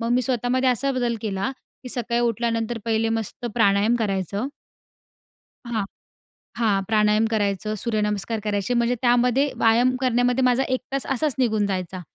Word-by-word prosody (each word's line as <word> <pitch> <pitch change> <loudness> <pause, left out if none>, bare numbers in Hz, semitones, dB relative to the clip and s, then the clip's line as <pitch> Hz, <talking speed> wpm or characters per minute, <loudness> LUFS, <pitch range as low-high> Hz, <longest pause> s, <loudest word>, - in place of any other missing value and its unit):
मग 230 +1 -2
मी 250 - +3
स्वतःमध्ये 255 +1 +1
असा 275 +3 0
बदल 245 -2 -1
केला, 200 0 -2 0.3
की 250 - -7
सकाळी 240 -1 -1
उठल्यानंतर 230 0 -1
पहिले 225 0 +1
मस्त 225 +1 -3
प्राणायाम 205 0 +3
करायचं 200 - -2 1.2
हां, 225 -4 -2 0.7
हां, 205 -4 +2
प्राणायाम 215 0 +3
करायचं, 210 -1 -1
सूर्यनमस्कार 210 0 -1
करायचे, 205 +3 -1
म्हणजे 235 +1 +2
त्यामध्ये 250 +3 +3
व्यायाम 235 +3 +4
करण्यामध्ये 250 0 +2
माझा 250 +1 +3
1 255 0 0
तास 275 - -2
असाच 270 +1 +1
निघून 220 -5 +2
जायचा. 185 -2 -3
230 Hz, 145 wpm, -23 LUFS, 210-245 Hz, 1.2 s, व्यायाम